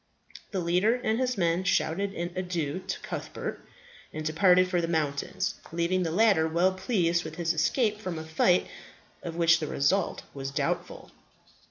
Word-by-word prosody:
The 195 - -2
leader 180 +7 +2
and 230 -2 -1
his 255 -2 0
men 170 0 +1
shouted 195 +2 0
an 175 +1 -3
adieu 175 -4 -2
to - - -3
Cuthbert, - - -6 0.5
and 155 0 -6
departed 180 +3 +4
for 180 -1 0
the 165 - -1
mountains, 160 +4 -1 0.2
leaving 170 +3 0
the 170 - 0
latter 195 -4 +4
well 175 +4 +2
pleased 180 -4 0
with 160 0 -7
his 170 0 0
escape 210 - +1
from 185 -6 -4
a 160 - -5
fight 160 +3 +3 0.6
of 165 -1 -6
which 165 -1 +4
the 155 - -3
result 170 +8 0
was 135 -1 -5
doubtful. 140 0 -3
175 Hz, 165 wpm, -28 LUFS, 160-190 Hz, 0.6 s, departed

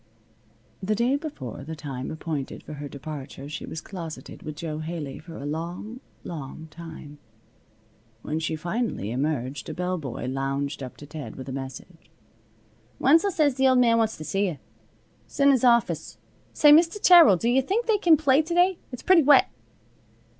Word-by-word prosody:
The 210 +3 0
day 240 +5 +2
before 280 - -6
the 160 +3 -6
time 135 -4 -6
appointed 155 -3 -5
for 155 - -9
her 145 -1 -7
departure 140 -1 -8
she 150 - -6
was 160 - -6
closeted 170 -5 -8
with 155 -1 -7
Jo 155 0 -5
Haley 155 -4 -5
for 165 +1 -11
a 140 - -7
long, 170 +10 -5 0.2
long 160 -1 -7
time. 155 -3 -10 1.0
When 155 +1 -2
finally 170 - -2
she 105 - -3
emerged 135 0 -2
a - - -5
bellboy 180 -10 -3
lounged 135 +2 -2
up 130 -2 -8
to 145 - -11
Ted 150 0 -8
with 130 - -9
a - - -4
message. 135 +5 -8 0.9
"Wenzel 325 +8 +4
says 305 -6 +2
th' 260 - -17
Old 260 -1 +5
Man 230 -2 +4
wants 220 -1 0
t' 155 - -7
see 195 +5 0
you. 165 -5 -4 0.7
'S - - -13
in 280 0 +6
his 260 -3 +2
office. 235 -2 +2 0.3
Say, 295 - +6
Mr. 335 +6 +5
Terrill, 340 - +8
do 230 - -2
yuh 250 +3 +4
think 405 - -1
they 440 -3 +2
can 335 -4 +5
play 280 -1 +4
to 325 +2 -4
day? 360 0 +3
It's 250 - -8
pretty 370 -3 +6
wet." 290 0 +5
165 Hz, 175 wpm, -25 LUFS, -, 1.0 s, Terrill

